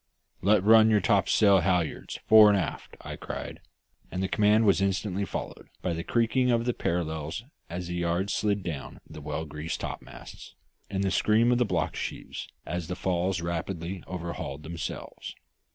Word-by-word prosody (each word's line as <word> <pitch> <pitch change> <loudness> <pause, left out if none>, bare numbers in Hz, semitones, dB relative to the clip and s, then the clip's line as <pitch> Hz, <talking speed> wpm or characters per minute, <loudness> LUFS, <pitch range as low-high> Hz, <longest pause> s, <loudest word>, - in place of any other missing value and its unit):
"Let 100 0 +4
run 110 +1 +7
your 105 -1 +4
topsail 100 -2 +4
halliards, 90 -2 -1
fore 110 -1 +8
and 100 - +4
aft," 95 - -4
I - - -6
cried; - - -6 0.5
and 95 +1 -2
the - - +1
command 105 +2 +3
was 100 -1 +4
instantly 100 0 0
followed - - -6 0.2
by 90 - 0
the 85 0 -3
creaking 120 +4 +1
of 120 -1 +2
the 125 - +1
parrels 80 +1 -2 0.3
as 90 +2 -4
the 90 - -5
yards 85 +3 0
slid 105 -2 0
down 75 -6 -6
the 75 - -10
well 75 +2 -4
greased 75 +2 -5
topmasts, - - -8 0.3
and 95 0 -1
the 95 - +1
scream 110 +5 +3
of 125 - +3
the 125 - +3
block 85 -6 -1
sheaves - - -5 0.2
as 85 -2 -4
the 90 - -3
falls 90 0 0
rapidly 85 +1 -4
overhauled 85 -5 -5
themselves. 85 0 -6
95 Hz, 170 wpm, -28 LUFS, 85-105 Hz, 0.5 s, fore